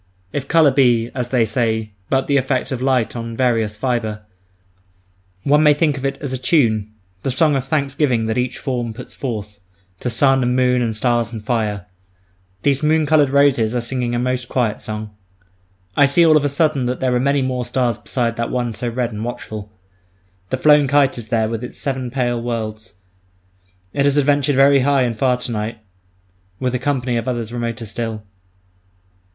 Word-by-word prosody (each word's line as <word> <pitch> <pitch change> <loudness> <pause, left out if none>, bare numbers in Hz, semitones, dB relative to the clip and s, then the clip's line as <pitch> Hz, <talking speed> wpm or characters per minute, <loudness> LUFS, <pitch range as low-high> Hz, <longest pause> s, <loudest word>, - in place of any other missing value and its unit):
If 140 -1 -3
colour 160 -2 +5
be, 120 -3 +2
as 125 -2 -3
they 125 -3 +2
say, 110 -1 -1 0.2
but 135 0 +1
the 140 - +2
effect 130 0 -1
of 130 -2 -3
light 130 -4 +1
on 115 -1 -5
various 115 -4 +1
fibre, 110 -5 -2 1.2
one 150 +2 +4
may 150 -1 +5
think 150 -1 +1
of 135 - -7
it 135 0 -1
as 140 -3 -5
a 130 - -3
tune, 115 -7 +2 0.3
the - - -2
song 145 +3 +2
of 135 -1 -1
thanksgiving 140 -4 0
that 110 0 -1
each 125 0 -1
form 120 -5 -3
puts 125 - -10
forth, 105 -5 -5 0.4
to 125 - -2
sun 135 +3 +3
and 125 0 +1
moon 125 -1 +2
and 115 -2 -1
stars 120 +1 0
and 110 -3 -7
fire. 105 -5 -1 0.8
These 140 0 +2
moon 155 0 +2
coloured 150 -2 +4
roses 130 -5 +3
are - - +1
singing 120 0 -2
a - - 0
most 125 0 -2
quiet 115 -5 -1
song. 110 0 -6 0.8
I 145 - +5
see 170 +5 +4
all 155 -1 +6
of 150 - +3
a - - +2
sudden 140 -3 +1
that 125 0 -2
there 130 -1 +1
are 125 - +2
many 140 +1 +1
more 130 -1 -2
stars 120 -2 -1
beside 115 -2 -2
that 115 0 -2
one 120 -2 -2
so 120 +3 -3
red 120 0 -2
and 105 0 -5
watchful. 110 -3 -6 0.8
The 130 - -1
flown 150 +1 +5
kite 140 -2 +2
is 115 - -9
there 110 0 +1
with 115 +1 -4
its 125 - -7
seven 130 -3 -2
pale 120 -2 -1
worlds; 110 -3 -4 1.0
it 140 0 +1
has 140 0 +2
adventured 145 -1 +2
very 140 +1 +5
high 135 0 +3
and 120 -2 -1
far 125 +2 +1
to 125 0 -5
night 110 +1 -3 0.8
with 130 -1 -1
a 125 - 0
company 130 -4 -1
of 115 - -3
others 120 -2 -3
remoter 115 -1 -3
still. 110 0 -5
125 Hz, 190 wpm, -19 LUFS, 115-135 Hz, 1.2 s, all